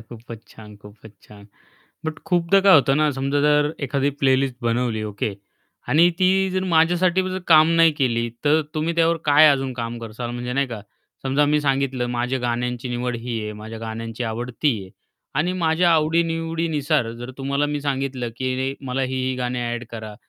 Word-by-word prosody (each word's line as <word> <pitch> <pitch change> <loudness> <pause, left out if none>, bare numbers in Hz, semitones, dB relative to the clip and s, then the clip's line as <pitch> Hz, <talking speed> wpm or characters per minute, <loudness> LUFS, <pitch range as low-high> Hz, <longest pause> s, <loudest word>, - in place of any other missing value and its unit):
खूपच 115 0 -12
छान, 105 -2 -13
खूपच 105 +1 -14
छान. 100 -1 -15 0.6
बट 160 0 -4
खूपदा 180 +2 +3
काय 195 -1 +6
होतं 135 -2 +4
ना, 155 0 +3
समजा 135 +1 -1
जर 150 +1 +2
एखादी 140 +1 0
प्लेलिस्ट 130 -1 +2
बनवली, 115 -1 0
ओके. 105 -1 -3 0.5
आणि 170 +4 +5
ती 185 -1 +4 0.2
जर 185 0 -1
माझ्यासाठी 175 +2 +3
जर 185 - -3
काम 155 -1 +7
नाही 165 -1 +6
केली, 120 -5 0 0.2
तर 150 +2 +4
तुम्ही 160 +2 -1
त्यावर 165 0 +3
काय 150 +1 +6
अजून 135 -2 +1
काम 120 -1 -5
कराल, 115 +1 -6
म्हणजे 120 +1 -4
नाही 140 +2 +1
का 115 -4 -7 0.4
समजा 135 +2 +2
मी 150 +1 +2
सांगितलं, 135 -3 0
"माझ्या 125 +2 -1
गाण्यांची 125 +1 -2
निवड 120 0 -2
ही 115 -1 -4
आहे, 105 - -5
माझ्या 110 +1 -8
गाण्यांची 115 +1 -5
आवड 120 +2 -4
ती 150 - +4
आहे" 95 - -12 0.5
आणि 175 +4 +1
माझ्या 165 +2 +3
आवडी-निवडीनुसार 165 -4 0
जर 120 +2 -8
तुम्हाला 140 +2 0
मी 145 0 -3
सांगितलं, 135 -3 -2
की 130 0 -2
"नाही 135 +1 -2
मला 130 +1 -1
ही, 130 0 -2
ही 130 - -1
गाणी 125 0 -2
एड 120 0 -3
करा 110 -2 -7
135 Hz, 180 wpm, -22 LUFS, 120-155 Hz, 0.6 s, काम